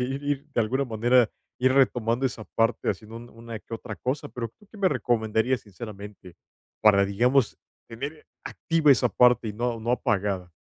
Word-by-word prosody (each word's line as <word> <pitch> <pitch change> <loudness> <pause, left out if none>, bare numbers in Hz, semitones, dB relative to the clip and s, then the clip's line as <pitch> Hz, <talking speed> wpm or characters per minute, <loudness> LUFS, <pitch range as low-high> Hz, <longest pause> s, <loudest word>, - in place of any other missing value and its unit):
ir 135 +3 -2
ir, 145 -1 -2
de 120 - +2
alguna 130 +5 0
manera, 120 0 +3 0.3
ir 130 +1 +3
retomando 125 -2 +2
esa 115 -4 -2
parte 115 +3 0
haciendo 110 +1 -4
un 120 +1 -10
una 115 -1 -8
que 115 - -8
otra 110 -2 -7
cosa, 145 +3 -3
pero, 115 -2 -5
¿tú 210 - -21
qué - - -14
me 195 - +3
recomendarías 115 -1 0
sinceramente, 100 -3 -10 0.4
para, 100 -2 +5
digamos, 120 +5 +2 0.3
tener 140 +7 -7 0.2
activa 165 -3 +1
esa 125 -1 +2
parte, 125 -2 +4
y - - -4
no 120 +1 -2
no 115 +2 -2
apagada? 100 -7 -1
120 Hz, 175 wpm, -26 LUFS, 110-130 Hz, 0.4 s, para